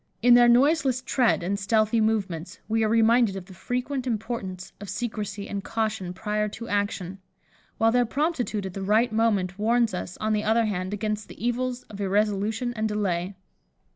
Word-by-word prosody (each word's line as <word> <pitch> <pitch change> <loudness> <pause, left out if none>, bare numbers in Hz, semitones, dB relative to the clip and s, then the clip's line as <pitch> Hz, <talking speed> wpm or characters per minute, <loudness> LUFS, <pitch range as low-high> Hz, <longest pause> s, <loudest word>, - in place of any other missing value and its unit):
In 245 0 +7
their 240 0 +7
noiseless 265 0 +3
tread 245 -9 +2
and 200 +3 -1
stealthy 215 +2 +2
movements, 200 -6 -1
we 225 +1 +1
are 215 - +2
reminded 230 -1 +4
of 190 -2 -6
the 190 - -13
frequent 250 +6 -3
importance 210 -5 -4
of 205 - -7
secresy 205 -1 -4
and 200 -1 -4
caution 215 -5 -2
prior 210 +3 -2
to 230 +3 -8
action, 200 -2 -2 0.6
while 225 0 +3
their 245 +1 +3
promptitude 260 - -1
at 190 - -5
the 195 - -5
right 215 +5 +2
moment, 205 -4 +1
warns 230 0 +2
us, 180 0 -5
on 215 0 0
the 210 0 0
other 225 +2 +3
hand, 185 -3 -2
against 210 0 -3
the - - -12
evils 250 +1 -1
of 205 -1 -9
irresolution 210 +4 0
and 220 -1 -1
delay. 190 -3 -1
215 Hz, 175 wpm, -26 LUFS, 200-235 Hz, 0.6 s, In